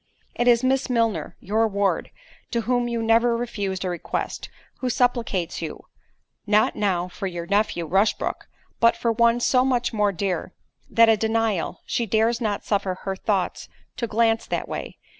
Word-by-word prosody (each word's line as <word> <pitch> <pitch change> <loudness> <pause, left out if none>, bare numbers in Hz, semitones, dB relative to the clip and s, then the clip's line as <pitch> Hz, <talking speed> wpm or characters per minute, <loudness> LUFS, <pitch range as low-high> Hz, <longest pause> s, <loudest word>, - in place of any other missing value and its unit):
"It 240 - -1
is 240 0 +5
Miss 265 +1 +1
Milner, 230 -3 0
your 220 +4 +1
ward, 200 -1 0 0.4
to 235 - 0
whom 245 +1 0
you 235 -1 -2
never 230 +1 +3
refused 200 -6 -3
a - - -1
request, 175 - -4 0.3
who 255 - -1
supplicates 235 -7 0
you—not 210 +1 -3
now 185 -4 0
for 195 +2 -5
your 175 -2 -5
nephew, 200 -3 0
Rushbrook, 195 +6 0 0.3
but 230 0 +4
for 230 - +1
one 235 +1 +3
so 250 +1 +3
much 250 -3 0
more 210 -2 +2
dear, 185 -1 -3 0.3
that 230 0 +5
a 225 - +6
denial——she 225 0 -1
dares 225 +3 +2
not 210 -3 -2
suffer 195 -3 0
her 195 -1 -2
thoughts 190 -1 -2 0.3
to 235 - -2
glance 225 +1 +1
that - - -2
way. - - -6
225 Hz, 160 wpm, -24 LUFS, 195-235 Hz, 0.4 s, a